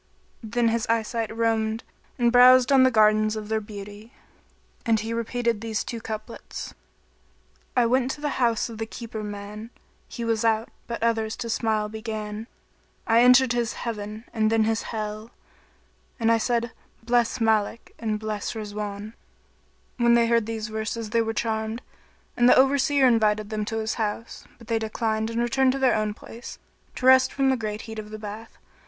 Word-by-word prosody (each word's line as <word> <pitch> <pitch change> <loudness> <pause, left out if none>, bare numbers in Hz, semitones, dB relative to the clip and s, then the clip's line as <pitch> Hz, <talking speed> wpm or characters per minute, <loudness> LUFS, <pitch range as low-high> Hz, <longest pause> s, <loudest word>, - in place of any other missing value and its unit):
Then 230 +1 +1
his 230 0 -1
eye 230 -1 +2
sight 225 0 -3
roamed 225 0 0 0.3
and 240 -1 +3
browsed 250 +1 +7
on 270 -1 +6
the 260 - +6
gardens 215 -1 +3
of 215 -1 -6
their 220 0 0
beauty 205 +2 -10 0.7
and 225 -1 +2
he 225 +2 -4
repeated 235 -1 -1
these 225 -2 -2
two 230 -2 -6
couplets, 215 +1 -7 1.0
"I 245 - +5
went 255 +2 +2
to 290 - -5
the 295 -3 -2
house 235 -2 +2
of 225 -2 -9
the 225 - -3
keeper 230 -1 -7
man; 210 +1 -7 0.2
* - - -38
He 235 - -3
was 225 -1 0
out, 225 0 +1 0.2
but 235 -1 -4
others 225 -1 0
to 230 - -4
smile 220 -2 0
began: 215 0 -5 0.6
I 230 +1 +4
entered 250 0 +6
his 240 -1 -1
Heaven[FN#23] 215 -1 -5
and 220 -1 +1
then 225 -1 +3
his 225 0 0
Hell;[FN#24] 215 0 -5 0.4
* - - -37
And 230 -1 +3
I 230 - +4
said 235 0 0 0.3
'Bless 240 +1 +1
Málik[FN#25] 220 -1 +1 0.2
and 215 -2 -2
bless 215 -1 -3
Rizwán.' 210 -2 -5
"[FN#26] - - -18 0.8
When 235 -1 +4
they 235 0 +4
heard 230 -2 +2
these 220 -1 -4
verses 220 0 -4
they 230 - +3
were 225 0 -1
charmed, 220 +1 -2 0.5
and 240 0 +5
the - - +7
Over 270 +2 +4
seer 275 0 +3
invited 215 -3 +2
them 215 -1 -2
to 225 +1 -3
his 220 0 -1
house; 220 +2 -4
but 230 - -15
they 225 0 0
declined 220 0 -1
and 230 0 -2
returned 255 +2 +2
to - - -2
their 260 -2 +4
own 215 -1 -1
place, 235 +3 -10 0.4
to 255 - -4
rest 260 0 +6
from 270 -1 +2
the - - +2
great 215 -3 -4
heat 220 -1 -7
of 210 0 -8
the 215 - -7
bath. 215 +1 -9
225 Hz, 185 wpm, -25 LUFS, 215-235 Hz, 1.0 s, browsed